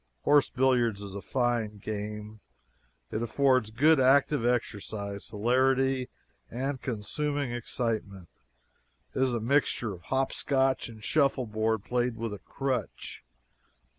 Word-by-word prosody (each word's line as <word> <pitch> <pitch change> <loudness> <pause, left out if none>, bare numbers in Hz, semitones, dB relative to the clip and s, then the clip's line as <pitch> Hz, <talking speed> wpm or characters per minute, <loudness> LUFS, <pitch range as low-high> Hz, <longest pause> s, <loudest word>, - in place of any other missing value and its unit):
Horse 145 -1 +4
billiards 125 -5 +2
is 100 -1 -7
a 100 - -5
fine 120 -4 -1
game. 105 +1 -6 0.7
It 110 - -2
affords 130 -1 +2
good, 145 +8 +4
active 135 0 +4
exercise, 105 -4 -2
hilarity, 130 +4 +2 0.4
and 130 +2 -3
consuming 140 +4 -2
excitement. 110 -6 -3 0.8
It - - -1
is 130 -2 +2
a - - 0
mixture 120 -2 +1
of 90 - -11
"hop 135 0 0
scotch" 135 -2 +1
and 110 -2 -12
shuffleboard 110 -7 +1
played 125 -1 -1
with 115 -2 -3
a 105 - -7
crutch. 130 -6 -4
120 Hz, 120 wpm, -29 LUFS, 110-135 Hz, 0.8 s, Horse